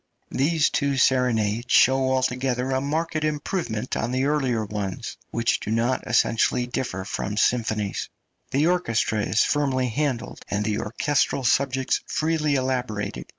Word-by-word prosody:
These 155 +3 +2
two 140 -1 0
serenades 120 -3 +2
show 130 0 +5
altogether 130 0 0
a 130 0 +1
marked 155 +2 -1
improvement 145 - -2
on 115 - -1
the 130 +2 0
earlier 130 -7 0
ones, 100 -2 -4
which 115 0 0
do - - -6
not 115 +3 +1
essentially 120 +2 +2
differ 120 -6 -3
from 100 +1 -3
symphonies. 110 -3 0 0.4
The 140 +3 +2
orchestra 115 - +1
is 105 +1 +2
firmly 130 -3 +1
handled, 125 -1 -2
and 105 +1 -1
the 105 -1 0
orchestral 135 +4 0
subjects 130 +1 +1
freely 155 -2 0
elaborated. 125 -6 -2
130 Hz, 135 wpm, -24 LUFS, 110-140 Hz, 0.4 s, show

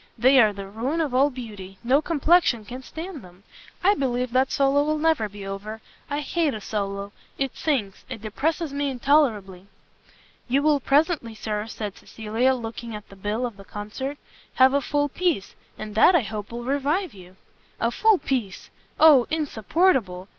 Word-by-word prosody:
They 260 +4 +5
are 215 -3 +6
the 200 -1 -7
ruin 235 +11 -3
of 300 -6 -1
all 270 +3 +4
beauty; 210 -7 -9
no 265 +5 +3
complexion 315 -7 +2
can 250 +4 -8
stand 320 +3 -8
them. 180 +1 -16 0.4
I 395 +3 +5
believe 250 - -1
that 260 +1 +2
solo 280 +1 +3
will 305 +1 0
never 305 -9 +1
be 200 -1 -9
over; 200 +3 -6 0.3
I 290 +1 -2
hate 305 -2 0
a - - -5
solo; 200 -1 -4 0.3
it 270 -2 -2
sinks, 240 -11 -2
it 255 -3 -6
depresses 295 +9 -2
me 285 0 -1
intolerably." 230 -9 +1 0.8
"You 270 +3 +1
will 300 -1 +3
presently, 280 -4 +1
Sir," 215 0 -3
said 210 -3 -6
Cecilia, 225 +4 0
looking 230 -1 -6
at 210 - -10
the 195 - -13
bill 210 +5 -2
of 235 -5 -6
the 195 - -12
concert, 215 +8 -6 0.4
"have 260 +1 +5
a 280 - +2
full 290 +1 0
piece; 315 - -1 0.2
and 215 -1 -7
that, 285 - +6
I 340 - +5
hope, 215 -1 -6
will 240 +1 -6
revive 285 +7 -1
you." 185 -1 -14 0.4
"A 230 - +1
full 440 - +4
piece! 240 - -3 0.3
oh 295 -6 +7
insupportable! 265 - 0
250 Hz, 175 wpm, -24 LUFS, 210-290 Hz, 0.8 s, oh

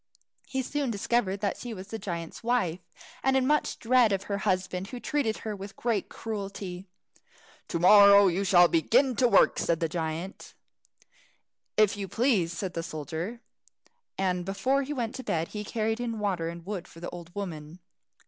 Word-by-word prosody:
He 265 -1 -2
soon 285 0 -2
discovered 200 -2 0
that 200 - -1
she 240 -2 -6
was 190 +1 -9
the 225 - -5
giant's 170 -4 -5
wife, 225 -8 0 0.4
and 265 0 +3
much 300 +1 +1
in - - -31
dread 240 -2 +4
of 195 0 0
her 200 0 -3
husband, 185 -1 -1
who 250 +3 -7
treated 280 -6 -1
her 215 -1 -3
with 195 +1 -9
great 230 -4 -1
cruelty. 195 -3 -6 0.8
"To - - -2
morrow 200 +3 +8
you 190 +1 +1
shall 180 -3 +6
begin 245 - +3
to 250 - +4
work," 200 - +4
said 165 -1 +1
the 165 - 0
giant. 165 +3 -5 1.2
"If 215 -1 +4
you 200 -1 -4
please," 215 -6 +1
said 180 +1 -4
the 165 - -2
soldier, 165 - -5 0.8
and 180 -2 0
before 200 +9 0
he 280 +2 -5
went 240 -6 -2
to 260 - -7
bed 165 -6 -1
he 210 -1 -5
carried 220 +1 -1
in 235 -2 -3
water 190 -6 -1
and 170 0 -9
wood 195 -3 -5
for 165 - -14
the 175 - -6
old 175 -1 -9
woman. 165 -5 -6
200 Hz, 175 wpm, -28 LUFS, 175-230 Hz, 1.2 s, morrow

